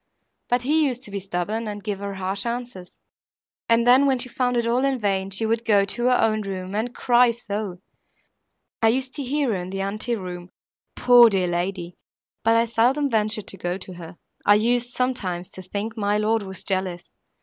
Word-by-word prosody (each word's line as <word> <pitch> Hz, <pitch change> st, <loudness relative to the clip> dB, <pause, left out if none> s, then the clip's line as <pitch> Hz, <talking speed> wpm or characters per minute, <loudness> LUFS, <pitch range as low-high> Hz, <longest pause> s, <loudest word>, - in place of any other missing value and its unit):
But 245 Hz, 0 st, +1 dB
he 310 Hz, +4 st, +3 dB
used 250 Hz, -1 st, -4 dB
to 210 Hz, -, -8 dB
be 200 Hz, -, -3 dB
stubborn, 195 Hz, +4 st, -3 dB
and 205 Hz, -1 st, -6 dB
give 205 Hz, -2 st, -3 dB
her 200 Hz, -1 st, -5 dB
harsh 190 Hz, +1 st, -3 dB
answers, 235 Hz, -6 st, -6 dB, 0.7 s
and 230 Hz, 0 st, +4 dB
then, 255 Hz, +3 st, +6 dB
when 265 Hz, -1 st, +2 dB
she 255 Hz, +1 st, -4 dB
found 245 Hz, 0 st, 0 dB
it 235 Hz, -, +1 dB
all 240 Hz, +3 st, +1 dB
in 275 Hz, -1 st, +1 dB
vain, 195 Hz, -3 st, -1 dB
she 195 Hz, +3 st, -2 dB
would 225 Hz, +1 st, 0 dB
go 205 Hz, -3 st, +3 dB
to 240 Hz, +4 st, -3 dB
her 250 Hz, 0 st, +4 dB
own 215 Hz, -1 st, +2 dB
room, 190 Hz, -1 st, -5 dB
and 230 Hz, +4 st, -2 dB
cry 245 Hz, -1 st, +4 dB
so! 210 Hz, -5 st, -4 dB, 1.0 s
I 225 Hz, -, +5 dB
used 260 Hz, +3 st, 0 dB
to 290 Hz, -, -4 dB
hear 280 Hz, +1 st, 0 dB
her 215 Hz, -, 0 dB
in 180 Hz, +1 st, -6 dB
the 195 Hz, +1 st, -4 dB
ante 215 Hz, +5 st, -1 dB
room, 180 Hz, -3 st, -7 dB, 0.5 s
poor 245 Hz, -1 st, +7 dB
dear 190 Hz, -3 st, +1 dB
lady! 175 Hz, 0 st, -3 dB, 0.5 s
but 225 Hz, 0 st, +4 dB
I 230 Hz, -, +3 dB
seldom 255 Hz, +5 st, +1 dB
ventured 215 Hz, -1 st, 0 dB
to 195 Hz, -, -6 dB
go 175 Hz, 0 st, -3 dB
to 185 Hz, -1 st, -10 dB
her. 170 Hz, 0 st, -10 dB, 0.3 s
I 205 Hz, -, +6 dB
used, 240 Hz, +3 st, +2 dB
sometimes, 195 Hz, -9 st, -2 dB
to 185 Hz, -, -8 dB
think 205 Hz, +4 st, -5 dB
my 205 Hz, -1 st, 0 dB
lord 220 Hz, +1 st, +1 dB
was 190 Hz, -2 st, -6 dB
jealous. 185 Hz, -2 st, -2 dB
215 Hz, 205 wpm, -23 LUFS, 190-245 Hz, 1.0 s, poor